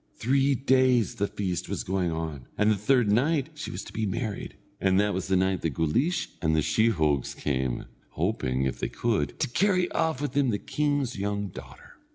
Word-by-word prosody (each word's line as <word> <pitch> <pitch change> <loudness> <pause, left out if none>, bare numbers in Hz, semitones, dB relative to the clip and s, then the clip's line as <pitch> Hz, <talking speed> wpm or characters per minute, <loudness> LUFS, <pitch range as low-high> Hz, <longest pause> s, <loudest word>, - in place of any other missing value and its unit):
Three 135 +3 +2
days 130 -4 +3
the 100 - -1
feast 95 -4 -3
was - - -2
going 95 -1 0
on, 80 -6 -4
and 105 +1 +4
the - - +3
third 110 +1 +2
night 140 +6 +2
she 150 - -6
was 90 - -5
to - - -11
be 110 -1 -1
married, 110 0 -4 0.2
and 95 0 +3
that 105 0 +2
was 95 - -3
the 95 - +2
night 95 0 +1
that 80 -5 -2
Guleesh 125 - +1
and 80 -2 +2
the 80 - +2
sheehogues 80 - +1
came, 65 -3 -2 0.3
hoping, 65 +1 0
if 65 -2 -2
they - - -2
could, 115 -3 -1
to 150 - +1
carry 185 +6 +2
off 160 -5 0
with 145 -2 -2
them 140 -1 +2
the 105 - +1
king's 145 -3 -1
young 100 0 -2
daughter. - - -12
105 Hz, 200 wpm, -27 LUFS, 85-130 Hz, 0.3 s, and